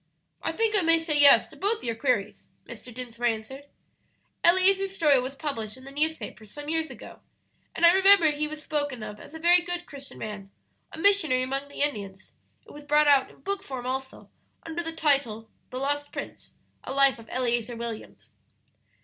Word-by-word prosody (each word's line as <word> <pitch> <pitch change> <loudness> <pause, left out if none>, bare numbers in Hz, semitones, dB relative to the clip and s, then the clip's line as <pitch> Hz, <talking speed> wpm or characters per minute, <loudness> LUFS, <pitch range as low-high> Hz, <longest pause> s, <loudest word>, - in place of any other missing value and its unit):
"I - - -2
think 450 -1 0
I 405 - +3
may 330 -1 +4
say 325 -2 -1
yes 285 -1 +8
to - - -14
both 425 +3 -2
your 230 - -1
queries," 225 -4 -2 0.2
Mr. 250 - -11
Dinsmore 240 0 -4
answered. 235 +5 -4 0.8
"Eleazer's 385 +2 +4
story 295 -7 +4
was 260 +2 -5
published 230 -7 -4
in 260 - -15
the 275 - -11
newspapers 295 -7 -3
some 290 +5 -8
years 320 0 -1
ago, - - -12 0.6
and 340 - +3
I 340 - +8
remember 385 -4 +6
he 300 +1 -2
was 305 0 -8
spoken 290 -6 -3
of 210 0 -8
as 320 - -13
a - - -7
very 350 +2 +5
good 350 0 -5
Christian 280 -3 -10
man, 205 -2 -7 0.4
a - - -10
missionary 320 -9 +3
among 270 +2 -3
the 285 - -3
Indians; 200 -9 -4 0.3
it - - -15
was 295 0 -12
brought 295 +1 +3
out 280 -2 +4
in - - -20
book 395 +5 -3
form 260 -6 -7
also 265 +1 -5 0.3
under 330 +1 -4
the 325 -1 -3
title 275 -9 0 0.2
'The 255 - -7
Lost 290 +2 -1
Prince: - - -8 0.3
A - - -6
Life 275 -2 +3
of 225 - -14
Eleazer 240 -2 -1
Williams.' 230 -1 -8
285 Hz, 190 wpm, -26 LUFS, 245-325 Hz, 0.8 s, yes